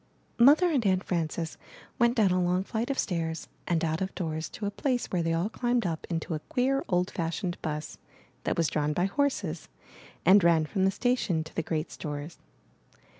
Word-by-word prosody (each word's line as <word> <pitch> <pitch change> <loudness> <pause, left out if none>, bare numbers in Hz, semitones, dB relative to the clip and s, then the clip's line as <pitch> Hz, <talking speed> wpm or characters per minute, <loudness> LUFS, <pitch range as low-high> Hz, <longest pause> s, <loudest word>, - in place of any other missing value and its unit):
II. 235 - +7
Mother 335 +5 +6
and 270 -6 +2
Aunt 185 -2 +2
Frances 165 -1 -2 0.4
went 235 +1 +4
down 205 -4 +4
a 185 0 +2
long 180 +1 +1
flight 225 +5 -3
of 275 - -1
stairs 165 -3 -2 0.2
and 170 -2 +1
out 160 +1 -1
of 190 0 -3
doors 160 -3 -3
to 210 - -6
a 200 - -1
place 250 +3 -1
where 180 - +1
they 165 0 0
all 165 +4 +1
climbed 240 0 0
up 165 -2 -3
into 165 -1 -2
a 155 - -2
queer, 270 +2 +1
old 180 0 +1
fashioned 175 +1 -3
bus, 150 -1 -4 0.4
that - - -1
was 165 -2 +3
drawn 150 0 0
by 175 +4 +1
horses, 285 +8 -1 0.6
and 195 0 +7
ran 165 -2 +4
from 190 +4 0
the - - +5
sta 245 +5 +1
tion 175 -10 0
to 160 - -13
the - - +1
great 155 0 -3
stores. 145 +1 -6
180 Hz, 205 wpm, -28 LUFS, 160-220 Hz, 0.6 s, II